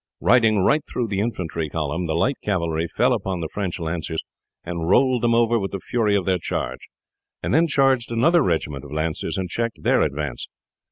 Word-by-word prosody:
Riding 110 Hz, -3 st, +4 dB
right 150 Hz, +7 st, +3 dB
through 120 Hz, -3 st, -2 dB
the 100 Hz, -1 st, -1 dB
infantry 85 Hz, -8 st, -2 dB
column 80 Hz, +3 st, -2 dB
the 80 Hz, -, -1 dB
light 125 Hz, +11 st, +1 dB
cavalry 85 Hz, -4 st, -1 dB
fell -, -, +2 dB
upon 95 Hz, -2 st, -2 dB
the 80 Hz, -, -3 dB
French 95 Hz, -4 st, -3 dB
lancers 80 Hz, -1 st, -3 dB, 0.4 s
and 85 Hz, -1 st, -4 dB
rolled 130 Hz, +3 st, +4 dB
them 115 Hz, -1 st, +3 dB
over 115 Hz, 0 st, +3 dB
with 95 Hz, -1 st, -4 dB
the 100 Hz, -, -2 dB
fury 105 Hz, 0 st, 0 dB
of 95 Hz, -3 st, 0 dB
their 95 Hz, -1 st, +1 dB
charge, -, -, -4 dB, 0.6 s
and -, -, -1 dB
then 165 Hz, +3 st, +4 dB
charged 135 Hz, -5 st, +2 dB
another 160 Hz, +10 st, +4 dB
regiment 75 Hz, -, -1 dB
of 70 Hz, -, -11 dB
lancers 80 Hz, +1 st, -2 dB
and 95 Hz, -1 st, -2 dB
checked 115 Hz, +5 st, -3 dB
their -, -, +3 dB
advance. 70 Hz, -3 st, -2 dB
95 Hz, 190 wpm, -23 LUFS, 80-115 Hz, 0.6 s, Riding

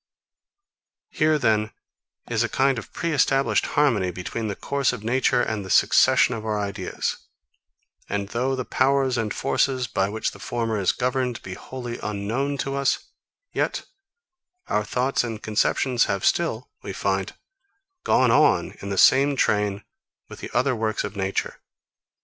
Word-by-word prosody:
Here, 155 Hz, 0 st, +2 dB
then, 110 Hz, -5 st, +1 dB, 0.5 s
is 115 Hz, -2 st, 0 dB
a 120 Hz, -, +1 dB
kind 135 Hz, -2 st, +2 dB
of -, -, -12 dB
pre 170 Hz, -, -2 dB
established 135 Hz, -1 st, +2 dB
harmony 115 Hz, -11 st, +3 dB
between 90 Hz, +5 st, -4 dB
the 100 Hz, -, -3 dB
course 140 Hz, +4 st, 0 dB
of 120 Hz, -4 st, -7 dB
nature 125 Hz, +1 st, +2 dB
and 110 Hz, -2 st, -2 dB
the 95 Hz, -, -9 dB
succession 125 Hz, -, +4 dB
of 110 Hz, -2 st, -5 dB
our 110 Hz, -1 st, -1 dB
ideas; 100 Hz, -2 st, -3 dB, 0.9 s
and 100 Hz, -1 st, -2 dB
though 130 Hz, +4 st, -1 dB
the 130 Hz, -1 st, -4 dB
powers 135 Hz, -1 st, +2 dB
and 110 Hz, -3 st, -1 dB
forces, 130 Hz, -2 st, 0 dB
by 95 Hz, -3 st, -1 dB
which 110 Hz, +1 st, -2 dB
the -, -, -14 dB
former 115 Hz, -3 st, -2 dB
is 95 Hz, -, +2 dB
governed, 125 Hz, -1 st, -1 dB
be 95 Hz, -, -6 dB
wholly 120 Hz, +3 st, -7 dB
unknown 115 Hz, +8 st, -2 dB
to 135 Hz, -, -3 dB
us; 140 Hz, -1 st, 0 dB, 0.4 s
yet -, -, -1 dB, 0.8 s
our 105 Hz, -, 0 dB
thoughts 125 Hz, +5 st, 0 dB
and 115 Hz, -3 st, -5 dB
conceptions 115 Hz, +3 st, +1 dB
have 100 Hz, -1 st, -2 dB
still, 130 Hz, -8 st, 0 dB
we -, -, -6 dB
find, -, -, -2 dB, 0.7 s
gone 130 Hz, -2 st, +3 dB
on -, -, +3 dB
in 100 Hz, -, -6 dB
the 100 Hz, -, -3 dB
same 140 Hz, +6 st, +5 dB
train 105 Hz, -4 st, +1 dB, 0.4 s
with -, -, -11 dB
the -, -, -7 dB
other 125 Hz, +2 st, +1 dB
works 110 Hz, -1 st, -1 dB
of 100 Hz, -, -6 dB
nature. 95 Hz, 0 st, -2 dB
115 Hz, 155 wpm, -24 LUFS, 105-130 Hz, 0.9 s, same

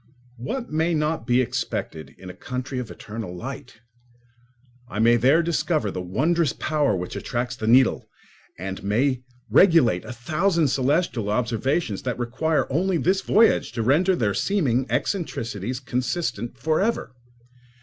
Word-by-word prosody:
What 235 Hz, -, -5 dB
may 160 Hz, +2 st, +1 dB
not 155 Hz, 0 st, -1 dB
be 125 Hz, 0 st, +4 dB
expected 125 Hz, -10 st, -4 dB
in 95 Hz, -, -12 dB
a -, -, -13 dB
country 125 Hz, +3 st, -5 dB
of 120 Hz, -3 st, -5 dB
eternal 110 Hz, -4 st, -7 dB
light? 130 Hz, +2 st, -8 dB, 1.1 s
I 100 Hz, -, -6 dB
may 115 Hz, +2 st, +5 dB
there 135 Hz, +8 st, +4 dB
discover 155 Hz, -, 0 dB
the 90 Hz, -, -4 dB
wondrous 150 Hz, -, +1 dB
power 150 Hz, -8 st, 0 dB
which 90 Hz, -1 st, -5 dB
attracts 125 Hz, +1 st, -3 dB
the 110 Hz, -3 st, -4 dB
needle 125 Hz, +2 st, +4 dB, 0.5 s
and 95 Hz, +2 st, -6 dB
may 125 Hz, +6 st, +1 dB, 0.3 s
regulate 160 Hz, -, +5 dB
a -, -, -8 dB
thousand 160 Hz, -, +1 dB
celestial 135 Hz, -, 0 dB
observations 115 Hz, -, -1 dB
that 125 Hz, -2 st, -3 dB
require 130 Hz, +6 st, 0 dB
only 180 Hz, +4 st, +1 dB
this 185 Hz, +4 st, +1 dB
voyage 220 Hz, -, +3 dB
to 115 Hz, -2 st, -2 dB
render 170 Hz, -, +3 dB
their 105 Hz, -9 st, 0 dB
seeming 135 Hz, -, 0 dB
eccentricities 125 Hz, -, -2 dB
consistent 125 Hz, -2 st, -3 dB
for 155 Hz, +8 st, 0 dB
ever. 215 Hz, -, -1 dB
130 Hz, 140 wpm, -24 LUFS, 115-160 Hz, 1.1 s, may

